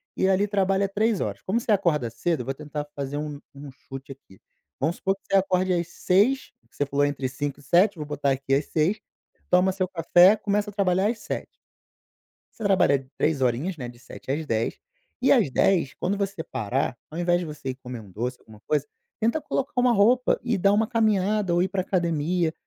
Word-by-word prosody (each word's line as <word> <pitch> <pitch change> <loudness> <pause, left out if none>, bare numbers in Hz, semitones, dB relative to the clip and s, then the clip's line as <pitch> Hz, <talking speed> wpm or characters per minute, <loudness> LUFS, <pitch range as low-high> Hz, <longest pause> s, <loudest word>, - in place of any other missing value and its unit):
e 190 - +2
ali 195 +2 +2
trabalha 195 -1 +1
3 215 +1 +1
horas. - - -3
Como 210 +5 0
você 230 - -2
acorda 160 - +1
cedo, 135 +3 -2
vou 135 - -2
tentar 150 +1 -6
fazer 140 0 -4
um 150 -1 -5
um 140 +1 -10
chute 135 +1 -10
aqui. 95 -8 -21 0.4
Vamos 160 +5 0
supor 195 0 0
que 195 - -30
você 195 - +2
acorde 185 -1 +2
às 170 0 0
6h, 215 +9 +1 0.2
que - - -27
você 145 - +1
falou 145 +1 +1
entre 140 -2 -2
5h 135 +2 -4
e - - -17
7h, 175 +7 +3
vou 150 - -5
botar 145 -1 -1
aqui 135 0 -1
às 140 +2 +2
6h, 170 +7 +1 0.5
toma 180 +1 +4
seu 185 -1 -1
café, 175 +3 +5
começa 205 0 -1
a - - -21
trabalhar 190 -1 +2
às 230 - -2
7h. - - -4 1.1
Você 225 - -8
trabalha 140 -9 +3
3 150 -3 +1
horinhas, 130 +9 0
né, 125 -4 -5
de 120 0 -11
7h 125 - -13
às 155 +3 -2
10h, 115 -4 -1 0.4
e 260 - +4
às 230 - +4
10h, 165 +1 +2
quando 195 +3 -1
você 195 -4 -3
parar, 120 +3 -2
ao 160 - -8
invés 175 0 +2
de 175 - -4
você 150 -4 -6
ir 130 - -3
comer 125 -2 -8
um 100 -3 -15
doce, 120 +6 -3
alguma 110 -1 -16
coisa, 150 -1 +1 0.4
tenta 230 +8 +2
colocar 275 +2 -2
uma 250 -1 +4
roupa 240 +5 +4
e 240 -3 0
dar 195 +2 +3
uma 220 +1 +3
caminhada 210 -4 +1
ou 175 - +3
ir 190 - -1
pra 190 -1 -1
academia. 170 -2 0
175 Hz, 210 wpm, -25 LUFS, 140-195 Hz, 1.1 s, café